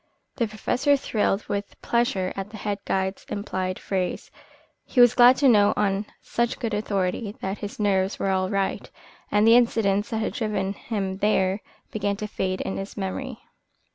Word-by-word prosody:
The 235 -4 +1
Professor 250 +6 +1
thrilled 210 -5 -1
with 200 -1 -4
pleasure 220 -6 0
at 195 +1 -5
the 215 - -9
head 205 -1 -3
guide's 190 0 -1
implied 185 -2 -3
praise. 185 -2 -3 0.5
He 255 - -2
was 245 -1 +8
glad 245 +1 +7
to 280 - +4
know 205 -4 +5
on 200 0 0 0.2
such 235 +1 -1
good 230 -4 -3
authority 205 0 -1
that 195 +2 -4
his 205 +1 -7
nerves 195 -2 +1
were 195 - 0
all 185 0 0
right, 195 -1 -1 0.4
and 210 +1 +4
the 225 +1 +7
incidents 210 -4 +2
that 225 - -2
had 220 - -2
driven 210 -4 -1
him 195 -3 -4
there 195 -1 +1 0.3
began 205 -1 -1
to 210 - -5
fade 185 -2 -2
in - - -3
his 195 +1 -6
memory. 220 +5 -4
205 Hz, 170 wpm, -25 LUFS, 195-220 Hz, 0.5 s, was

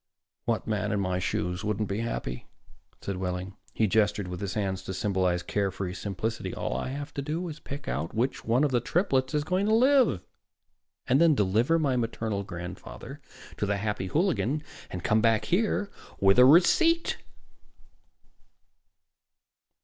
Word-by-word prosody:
"What 115 -2 0
man 105 0 -1
in 100 - 0
my 90 -2 0
shoes 90 +1 -2
wouldn't 105 0 -1
be 100 +2 -2
happy?" 115 - -4 0.5
said 100 -2 -4
Wehling. 90 +1 -4 0.2
He 110 - +1
gestured 105 -2 +1
with 90 +1 -6
his 100 -2 -3
hands 95 -3 -1
to 95 - -4
symbolize 95 -3 0
care 100 +1 0
free 95 -1 -4
simplicity. 100 0 -4
"All - - -3
I - - -2
have 145 +3 -6
to 140 - -3
do 160 +5 -3
is 160 -1 -7
pick 140 0 -8
out 70 +7 -2
which 125 +4 -1
one 120 +5 +2
of 145 - +2
the 125 - +3
triplets 135 - 0
is 150 - +1
going 185 +6 0
to 220 - +4
live, 255 - +4 0.9
then 155 +4 +4
deliver 110 +9 +2
my 140 -5 +1
maternal 115 -3 -2
grandfather 90 0 -8 0.4
to 105 - -1
the 100 0 0
Happy 100 -2 -2
Hooligan, 155 - 0 0.3
and 90 - -6
come 110 +1 +3
back 115 -1 +3
here 205 +1 0 0.3
with 95 +3 +5
a 125 - +9
receipt." 330 - +5
110 Hz, 160 wpm, -28 LUFS, 95-145 Hz, 0.9 s, a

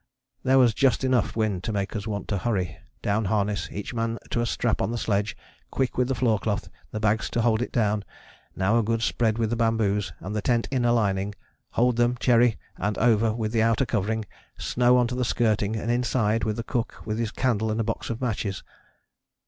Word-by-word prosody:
There 130 0 +3
was 125 -3 +5
just 135 +2 +2
enough 130 -2 +1
wind 105 -5 0
to - - -2
make 100 0 -2
us 105 0 -4
want 100 -3 -4
to 100 - 0
hurry: 95 -5 -1 0.3
down 105 +2 +1
harness, 100 +1 0
each 105 +4 -5
man 115 0 -1
to 120 - +1
a 120 - 0
strap 115 -1 0
on 95 - 0
the 120 - -2
sledge 105 -2 -1 0.3
quick 130 -2 -1
with 125 -1 +2
the 135 - 0
floor 115 -3 +2
cloth 105 -1 -2 0.2
the 110 - -4
bags 110 0 +1
to 120 - 0
hold 115 -1 +2
it 125 - -3
down 105 -3 +1 0.5
now 100 +5 +2
a - - +1
good 115 +1 0
spread 110 -2 +1
with 115 -1 0
the - - +1
bamboos 110 -3 +1
and 105 +3 -5
the 105 - 0
tent 120 +1 +1
inner 125 -3 +2
lining 100 -3 +1 0.4
hold 125 0 +2
them, 120 +1 +2
Cherry, 120 -2 +4 0.2
and 105 0 -1
over 115 -1 +3
with 110 -2 -2
the 115 -1 +2
outer 115 +3 +3
covering 110 0 -1 0.3
snow 125 0 +3
on 125 - +4
to 120 - -3
the 125 0 0
skirting 110 -3 +1
and 115 +2 -1
inside 115 -2 +1
with 110 -1 -1
the 115 - -4
cook 120 0 -3
with 110 +1 -2
his 115 -2 0
candle 110 -3 0
and 110 +1 -1
a - - +2
box - - -3
of 115 0 -3
matches.... 105 -5 -2
115 Hz, 220 wpm, -26 LUFS, 105-120 Hz, 0.5 s, was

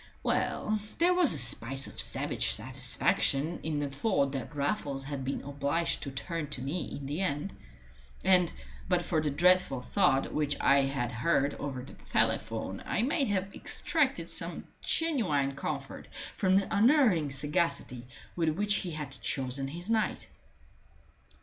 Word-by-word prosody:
Well, 215 0 0 0.2
there 350 +2 +4
was 355 -5 +4
a - - +1
spice 130 +2 +4
of - - -2
savage - - +1
satisfaction 140 - 0
in 155 -2 -2
the 145 -1 -2
thought 140 -2 +1
that 135 +2 -5
Raffles 140 -2 -1
had 140 -1 -5
been 135 +2 -3
obliged 145 +4 -1
to 140 - -3
turn 165 +3 -4
to 140 -3 -6
me 155 +6 -3
in 140 - -8
the 145 +6 -3
end. 150 +1 -2 0.7
And, 180 -2 +4 0.4
but 180 -1 +2
for 160 -3 +1
the 155 - 0
dreadful 175 -2 +3
thud 145 -3 +2
which 145 -1 0
I 140 0 +4
had 135 -3 -2
heard 140 +3 +1
over 135 -3 -4
the 130 - -11
telephone, - - -1
I 220 - 0
might 275 +1 +1
have 195 -1 -1
extracted - - -1
some - - -4 0.2
genuine 190 - 0
comfort 140 -1 -5 0.3
from 190 -2 +2
the 195 +2 +1
unerring 215 - +4
sagacity 140 -3 -1 0.3
with 165 -2 +1
which 205 +6 +2
he 185 - -3
had 150 -3 -5
chosen 135 +1 -1
his 170 +6 -7
night. 220 -1 0
150 Hz, 150 wpm, -30 LUFS, 135-185 Hz, 0.7 s, there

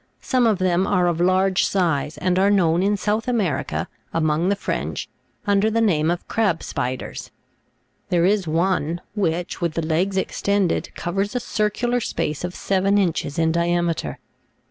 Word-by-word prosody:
Some 250 -3 +2
of 215 -3 +2
them 185 0 +1
are 180 -3 +2
of 170 -1 0
large 185 +1 +3
size, 165 -6 0
and 185 0 +1
are 195 +1 +4
known, 175 -4 +3
in 205 +2 +2
South 215 +4 -1
America, 220 -10 -1 0.2
among 160 +2 +1
the 200 - +2
French, - - -3 0.4
under 205 +1 +3
the 225 +1 0
name 165 -8 +2
of 175 0 -2
crab 200 -7 0
spiders; 125 +1 -4 0.8
there 175 -1 +3
is 195 -2 +2
one, 170 0 0
which, 180 -3 -2
with 170 -2 -1
the 165 - -1
legs 180 +5 0
extended, 200 -1 0
covers 195 +6 -2
a - - +2
circular 240 +2 0
space 150 - -3
of 180 0 -4
seven 195 +1 +1
inches 170 -7 0
in 160 -1 +2
diameter. 170 - 0
185 Hz, 160 wpm, -22 LUFS, 170-200 Hz, 0.8 s, are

